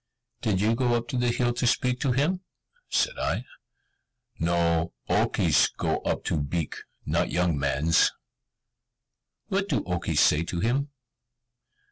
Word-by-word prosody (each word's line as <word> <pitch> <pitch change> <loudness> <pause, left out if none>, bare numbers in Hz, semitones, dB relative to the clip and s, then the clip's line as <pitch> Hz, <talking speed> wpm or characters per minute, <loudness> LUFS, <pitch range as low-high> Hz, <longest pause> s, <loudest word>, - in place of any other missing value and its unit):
"Did 105 -5 +1
you 110 +2 +3
go 120 0 +1
up 120 0 -2
the 125 -1 0
hill 120 0 +1
to 120 0 0
speak 125 0 +1
to 135 - +1
him?" 155 +9 +1 0.5
said - - 0
I. - - -1 0.9
"No, 85 -1 +1
Okes - - +3
go - - 0
up - - -2
to 80 - 0
Beek, 75 +2 -3 0.3
not - - 0
young 90 -2 +1
mans." 70 +3 +2 1.4
"What 195 +1 0
do 140 - 0
Okes 90 -2 -1
say 75 - +4
to 85 +1 -3
him?" 130 +8 0
115 Hz, 135 wpm, -26 LUFS, 85-125 Hz, 1.4 s, say